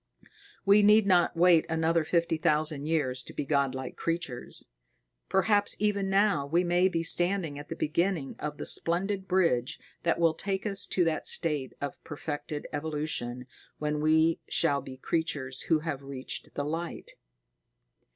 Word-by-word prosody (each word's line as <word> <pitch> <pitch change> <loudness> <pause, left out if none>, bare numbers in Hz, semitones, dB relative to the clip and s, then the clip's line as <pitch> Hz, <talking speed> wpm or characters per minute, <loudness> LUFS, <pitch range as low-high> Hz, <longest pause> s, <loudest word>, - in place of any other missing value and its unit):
We 200 +1 +6
need 210 +1 +6
not 175 -3 +3
wait 170 -2 +5
another 160 0 +1
fifty 165 0 0
thousand 150 -1 0
years 135 -6 0
to - - -8
be - - -3
godlike 135 -3 -1
creatures. 165 -7 -4 0.6
Perhaps 205 +2 +3
even 200 -2 0
now 195 -7 +2
we 170 +5 +2
may 175 +1 +3
be 165 -3 -1
standing 175 -3 +1
at 145 - -10
the - - -4
beginning 170 -1 -1
of 150 -1 -5
the - - -5
splendid 190 +3 +1
bridge 165 -10 +1 0.2
that 170 - +1
will 165 -1 +3
take 195 +4 -3
us 200 -2 0
to 180 - +1
that 165 -2 -1
state 150 -6 +1
of 145 - -6
perfected 150 -1 -5
evolution 145 -5 -3 0.3
when 150 0 -2
we 160 +1 +3
shall 145 -4 +2
be 130 0 -10
Creatures 140 -3 -2
who 160 -2 +3
have 155 -4 -4
reached 135 -1 -7
the 145 - -2
Light. 165 +3 -5
160 Hz, 150 wpm, -28 LUFS, 145-180 Hz, 0.6 s, We